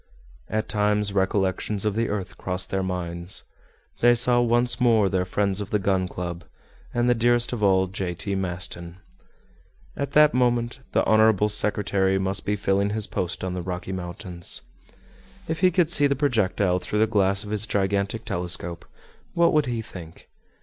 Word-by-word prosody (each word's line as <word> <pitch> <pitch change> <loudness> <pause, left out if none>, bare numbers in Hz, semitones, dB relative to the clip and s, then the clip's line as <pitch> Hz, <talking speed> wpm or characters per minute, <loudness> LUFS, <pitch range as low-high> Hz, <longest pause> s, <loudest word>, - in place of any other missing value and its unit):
At 110 0 -1
times 105 -1 +1
recollections 95 +1 0
of 105 - +1
the 115 +2 -1
earth 95 -3 -4
crossed 90 0 -4
their 95 - 0
minds. 90 -1 -2 0.6
They 120 0 +5
saw 120 +1 +4
once 120 +1 +2
more 110 -5 +4
their 95 -1 0
friends 100 +1 0
of 100 - -6
the 105 - +1
Gun 95 -2 0
Club, 85 -1 -6 0.5
and 120 0 0
the 120 - +5
dearest 120 +1 +2
of 120 - -4
all, 95 -2 +4
J. 95 -2 -4
T. 100 +3 -3
Maston. 90 -2 -4 1.0
At 140 0 -4
that 150 0 +6
moment, 120 0 +1
the - - +2
honorable 110 -1 +4
secretary 100 -2 +1
must 95 0 -2
be 105 - +1
filling 100 0 +1
his 105 0 -1
post 90 +1 -4
on 95 -1 -2
the 90 - -3
Rocky 90 +1 -5
Mountains. 90 -1 -4 0.8
If 160 0 -3
he 185 - +5
could 175 -2 +1
see 145 -5 +5
the 140 - 0
projectile 105 -9 +1
through 90 +4 -4
the 110 - +4
glass 100 -2 +2
of 105 - -8
his 105 +1 -1
gigantic 100 +2 -1
telescope, 85 -1 -3 0.5
what 170 0 +4
would 150 -3 +2
he 115 -2 -2
think? 85 -5 -12
100 Hz, 170 wpm, -24 LUFS, 95-115 Hz, 1.0 s, that